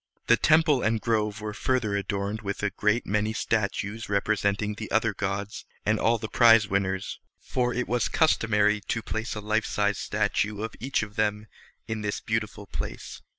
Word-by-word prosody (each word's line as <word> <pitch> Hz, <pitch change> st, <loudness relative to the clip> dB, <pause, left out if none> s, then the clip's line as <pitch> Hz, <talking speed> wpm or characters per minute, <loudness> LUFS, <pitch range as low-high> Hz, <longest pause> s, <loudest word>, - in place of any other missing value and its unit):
The 120 Hz, -, +6 dB
temple 155 Hz, -1 st, +4 dB
and 110 Hz, +1 st, +1 dB
grove 105 Hz, -2 st, 0 dB
were 105 Hz, 0 st, -4 dB
further 115 Hz, -3 st, 0 dB
adorned 100 Hz, +1 st, -2 dB
with 100 Hz, 0 st, -4 dB
a 105 Hz, -, +1 dB
great 105 Hz, +3 st, +1 dB
many 105 Hz, +2 st, 0 dB
statues 110 Hz, -1 st, -2 dB
representing 100 Hz, 0 st, 0 dB
the 110 Hz, +1 st, -7 dB
other 110 Hz, 0 st, +2 dB
gods 100 Hz, +1 st, -3 dB, 0.2 s
and 110 Hz, +1 st, +2 dB
all 115 Hz, +1 st, +3 dB
the 110 Hz, -, -5 dB
prize 115 Hz, -2 st, +6 dB
winners, 95 Hz, 0 st, -1 dB, 0.2 s
for 125 Hz, -1 st, -1 dB
it 125 Hz, +1 st, -2 dB
was 120 Hz, 0 st, 0 dB
customary 105 Hz, -9 st, +2 dB
to 115 Hz, -, -1 dB
place 110 Hz, +1 st, -3 dB
a 105 Hz, -, -4 dB
life 110 Hz, +1 st, 0 dB
sized 105 Hz, -1 st, 0 dB
statue 105 Hz, 0 st, -1 dB
of 110 Hz, -, -4 dB
each 135 Hz, -1 st, 0 dB
of 105 Hz, -1 st, -9 dB
them 105 Hz, 0 st, 0 dB, 0.4 s
in 110 Hz, -1 st, -3 dB
this 105 Hz, -1 st, -2 dB
beautiful 110 Hz, -2 st, -3 dB
place. -, -, -6 dB
105 Hz, 175 wpm, -27 LUFS, 105-115 Hz, 0.4 s, The